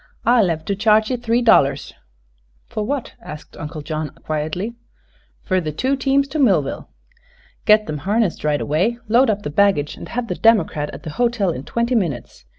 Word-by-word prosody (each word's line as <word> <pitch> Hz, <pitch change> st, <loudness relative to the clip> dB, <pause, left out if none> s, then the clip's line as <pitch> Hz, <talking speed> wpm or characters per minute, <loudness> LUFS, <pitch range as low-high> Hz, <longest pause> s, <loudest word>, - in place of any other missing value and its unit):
"I'll 235 Hz, -5 st, +4 dB
hev 160 Hz, -2 st, -2 dB
to 200 Hz, -, -1 dB
charge 215 Hz, +2 st, +3 dB
ye 250 Hz, -, 0 dB
three 240 Hz, 0 st, 0 dB
dollars." 140 Hz, -11 st, +3 dB, 0.7 s
"For 215 Hz, -, -4 dB
what?" 275 Hz, +3 st, -3 dB
asked 150 Hz, 0 st, -10 dB
Uncle 150 Hz, 0 st, -7 dB
John, 155 Hz, 0 st, -3 dB
quietly. 155 Hz, +8 st, -4 dB, 0.7 s
"Fer 185 Hz, -1 st, 0 dB
the 155 Hz, -2 st, -3 dB
two 260 Hz, -, 0 dB
teams 275 Hz, +1 st, +1 dB
to 305 Hz, +3 st, -3 dB
Millville." 185 Hz, -, +1 dB, 0.8 s
"Get 215 Hz, 0 st, +6 dB
them 150 Hz, -1 st, -4 dB
harnessed 205 Hz, +1 st, 0 dB
right 150 Hz, -1 st, +1 dB
away, 185 Hz, +11 st, 0 dB
load 240 Hz, +4 st, +4 dB
up 205 Hz, -1 st, -1 dB
the 145 Hz, -, -4 dB
baggage, 175 Hz, -4 st, +2 dB
and -, -, -9 dB
have 245 Hz, 0 st, -3 dB
the -, -, -2 dB
democrat 175 Hz, -10 st, +2 dB
at -, -, -10 dB
the 160 Hz, -, -6 dB
hotel 235 Hz, -6 st, +1 dB
in 135 Hz, -3 st, -6 dB
twenty 235 Hz, +6 st, -1 dB
minutes. 145 Hz, -, -2 dB
200 Hz, 180 wpm, -20 LUFS, 155-235 Hz, 0.8 s, Get